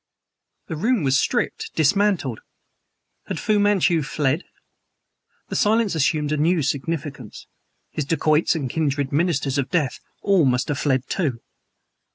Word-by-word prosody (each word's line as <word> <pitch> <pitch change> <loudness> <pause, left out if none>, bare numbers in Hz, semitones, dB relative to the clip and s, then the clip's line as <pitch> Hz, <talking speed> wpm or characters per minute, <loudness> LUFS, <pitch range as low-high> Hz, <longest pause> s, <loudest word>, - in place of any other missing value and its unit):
The 160 - -5
room 225 +4 +1
was 135 -1 +3
stripped, - - -1
dismantled. 165 - +2 0.9
Had - - -3
Fu 210 -1 +1
Manchu 190 -5 +3
fled? 145 +2 -1 1.0
The - - -4
silence 220 -1 +2
assumed 150 -1 +1
a 155 - +1
new 160 +2 +2
significance. 140 -3 -4 0.5
His 150 - -3
dacoits 155 +2 +2
and 145 -5 -2
kindred 140 -1 -1
ministers 145 -3 0
of 135 - -1
death 155 -7 0 0.2
all 195 -6 +4
must 125 +1 +1
have 145 -2 -1
fled, 130 -3 0
too. 140 -11 -2
150 Hz, 135 wpm, -22 LUFS, 135-175 Hz, 1.0 s, all